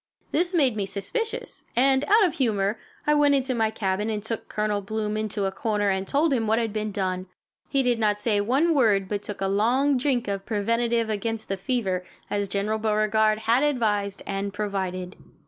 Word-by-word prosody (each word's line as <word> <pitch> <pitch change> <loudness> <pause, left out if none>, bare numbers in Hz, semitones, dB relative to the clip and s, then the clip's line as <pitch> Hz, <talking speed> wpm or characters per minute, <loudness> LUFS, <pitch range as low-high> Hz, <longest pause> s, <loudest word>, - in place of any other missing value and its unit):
This 350 +3 +1
made 270 -8 +3
me 200 -2 -2
suspicious, 455 - -4
and, 265 +2 +4
out 425 +4 +5
of 350 - 0
humor, 215 -5 +1 0.3
I 300 - +4
went 290 -1 +4
into 265 -1 0
my 225 -2 +1
cabin 210 -1 -1
and 210 -2 -2
took 225 0 -4
Colonel 210 -1 -1
Bloom 215 +1 -3
into 215 -2 -2
a 195 - 0
corner 205 +1 0
and 190 0 -2
told 295 +1 +2
him 225 -4 0
what 220 +1 +3
had 225 -3 -1
been 215 -1 -2
done. 185 -2 -2 0.4
He 275 -1 +2
did 245 -2 +1
not 210 -2 +2
say 210 -1 +1
one 275 +10 +2
word 210 -9 +3
but 205 +1 -2
took 205 -1 -7
a 195 - +1
long 250 +8 +2
drink 250 -3 0
of 195 -1 -2
preventive 230 +2 0
against 225 +1 -3
the 195 - 0
fever, 195 -3 -1 0.3
as 205 -1 -1
General 205 +3 -1
Beauregard 215 0 +2
had 235 +3 +4
advised 210 -8 0
and 200 0 -3
provided. 190 -3 -3
215 Hz, 195 wpm, -25 LUFS, 200-245 Hz, 0.4 s, out